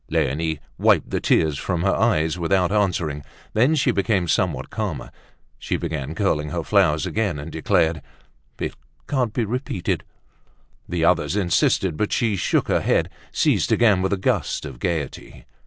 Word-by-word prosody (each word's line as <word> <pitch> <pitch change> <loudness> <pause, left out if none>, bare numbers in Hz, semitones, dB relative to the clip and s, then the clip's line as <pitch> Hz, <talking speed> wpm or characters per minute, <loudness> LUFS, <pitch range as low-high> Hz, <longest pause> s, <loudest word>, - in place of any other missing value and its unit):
Leonie 80 0 0 0.2
wiped - - +3
the - - 0
tears 75 -3 +2
from 90 -3 -2
her - - +2
eyes 80 +1 +2
without 90 +2 +1
answering. 85 -8 0 0.3
When 125 +8 +3
she 135 -4 +2
became 100 -4 +1
somewhat 80 -7 0
calmer, - - -4 0.5
she - - -2
began 80 -3 -4
curling 75 -7 0
her 85 +1 -3
flowers 80 -6 +2
again 105 -8 -1
and 75 +3 -7
declared, 80 0 +1 0.6
"It - - -3 0.3
can't 130 -5 0
be 115 +1 -1
repeated." 120 -5 -2 0.9
The 85 -1 0
others 90 +2 +2
insisted, 90 -3 +1
but 105 - -1
she 115 -4 +1
shook 90 - +1
her - - +2
head, - - +1 0.2
seized - - +1
again 105 -6 +4
with 95 +1 0
a 100 - +1
gust 95 - -1
of 65 -3 -8
gaiety. 80 -3 -4
85 Hz, 155 wpm, -22 LUFS, 80-105 Hz, 0.9 s, again